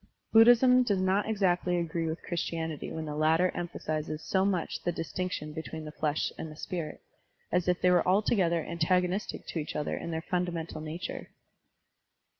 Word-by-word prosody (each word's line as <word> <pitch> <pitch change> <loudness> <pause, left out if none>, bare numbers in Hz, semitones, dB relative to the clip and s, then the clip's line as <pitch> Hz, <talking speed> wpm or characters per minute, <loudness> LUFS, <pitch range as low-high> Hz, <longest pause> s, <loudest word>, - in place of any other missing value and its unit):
Buddhism 245 +3 +7
does 205 -6 +1
not 190 +3 +1
exactly 180 -4 +1
agree 165 -1 -1
with 160 +1 -4
Chris 175 -1 -2
tianity 160 -3 -4
when 160 0 -4
the 150 - -4
latter 160 +4 +3
emphasizes 155 -3 -4
so 190 -1 +1
much 190 -4 -1
the 175 - 0
distinction 165 -2 -4
between 160 0 -6
the 150 - -6
flesh 150 -1 -1
and 160 - -5
the - - -10
spirit, 160 -1 -5 0.5
as 180 -1 +1
if 180 0 +2
they 180 - +5
were 180 -1 +3
altogether 185 -4 +2
antagonistic 180 +3 0
to 165 - -4
each 150 - -5
other 150 - -1
in - - -5
their 160 0 -3
fundamental 175 -4 -2
nature. 160 +3 -6
170 Hz, 170 wpm, -30 LUFS, 160-185 Hz, 0.5 s, Buddhism